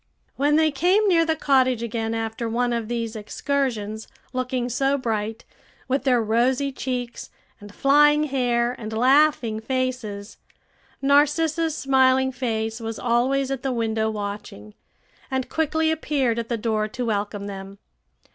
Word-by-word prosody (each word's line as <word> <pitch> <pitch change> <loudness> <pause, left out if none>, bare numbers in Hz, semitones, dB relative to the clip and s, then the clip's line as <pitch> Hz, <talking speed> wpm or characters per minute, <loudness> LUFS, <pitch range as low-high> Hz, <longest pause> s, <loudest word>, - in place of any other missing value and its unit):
When 290 +2 +2
they 315 0 +3
came 365 +9 +2
near 335 -4 +4
the 320 - +2
cottage 260 -5 +2
again 225 -1 -2
after 225 +1 -3
one 240 +1 0
of 230 -2 -2
these 230 -1 -3
excursions, 220 -1 -2 0.3
looking 255 -1 -2
so 270 +3 +1
bright, 225 -3 -3 0.4
with 270 +2 -1
their 250 -2 +4
rosy 250 +5 +1
cheeks, 250 -2 -4 0.3
and 205 -1 -12
flying 295 +5 +4
hair, 245 -4 0
and 215 -1 -6
laughing 255 -2 +3
faces, 235 -4 -3 0.7
Narcissa's 310 +3 +2
smiling 265 -1 +3
face 225 -3 -2
was 225 -1 -5
always 260 +3 +1
at 270 -2 -3
the 270 - -1
window 220 -2 0
watching, 205 - -6 0.6
and 260 -1 -2
quickly 320 0 +1
appeared 275 -7 0
at 230 - -5
the 235 - 0
door 215 -1 -1
to 245 +3 -4
welcome 205 -2 -2
them. 195 0 -8
245 Hz, 140 wpm, -23 LUFS, 220-275 Hz, 0.7 s, near